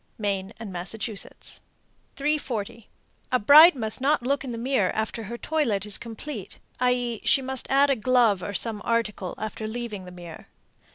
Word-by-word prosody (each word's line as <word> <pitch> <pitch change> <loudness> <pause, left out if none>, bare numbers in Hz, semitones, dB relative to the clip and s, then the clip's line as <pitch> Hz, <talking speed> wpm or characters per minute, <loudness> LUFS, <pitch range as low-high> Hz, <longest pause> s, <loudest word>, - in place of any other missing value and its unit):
Maine 200 -2 -2
and 215 -4 -7
Massachusetts. 200 +4 -4 0.5
340. 255 -7 -3 0.4
A 255 - +4
bride 300 +8 +8
must 220 -1 -2
not 280 -1 +2
look 275 +2 0
in 265 - -6
the 230 - -5
glass 235 -5 +1
after 220 +1 -3
her 235 +4 -6
toilet 235 -10 -1
is 210 -1 +4
complete, 230 -2 -7 0.2
i.e., 245 -2 0
she - - +4
must 265 -1 -2
add 275 +1 +4
a - - +3
glove 230 -4 +3
or 200 +2 -5
some 220 -1 +1
article 215 -5 -1
after 215 0 -5
leaving 220 -4 -5
the 180 - -10
mirror. 175 -2 -11
230 Hz, 165 wpm, -25 LUFS, 205-260 Hz, 0.5 s, bride